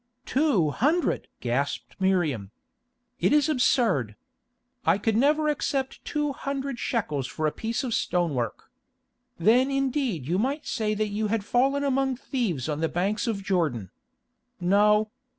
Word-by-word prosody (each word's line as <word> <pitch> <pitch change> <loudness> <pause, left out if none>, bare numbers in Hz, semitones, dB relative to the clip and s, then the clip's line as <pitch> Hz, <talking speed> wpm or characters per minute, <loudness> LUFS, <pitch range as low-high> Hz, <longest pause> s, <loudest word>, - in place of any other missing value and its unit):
"Two 255 - +2
hundred!" 315 - +1
gasped 125 +4 -2
Miriam. 165 - +1 0.7
"It - - +2
is 295 0 +4
absurd. 235 - +2 0.7
I - - +3
could 220 +1 0
never 300 +6 +3
accept 275 -3 -1
two 295 -1 -1
hundred 275 -2 -4
shekels 150 - -1
for 155 - -3
a 155 - +2
piece 225 - -3
of 245 -3 -2
stonework. 150 - -1 0.7
Then 240 +9 +4
indeed 265 - -1
you 180 +4 +1
might 275 +7 -1
say 215 -1 -1
that 215 0 -1
you 210 +1 -1
had 210 -1 -1
fallen 270 +5 +2
among 270 -1 +1
thieves 230 - -2
on 150 -1 -2
the 160 0 0
banks 200 +7 -1
of 205 -4 -2
Jordan. 155 - -1 0.7
No. 210 +4 +3
215 Hz, 140 wpm, -26 LUFS, 170-270 Hz, 0.7 s, is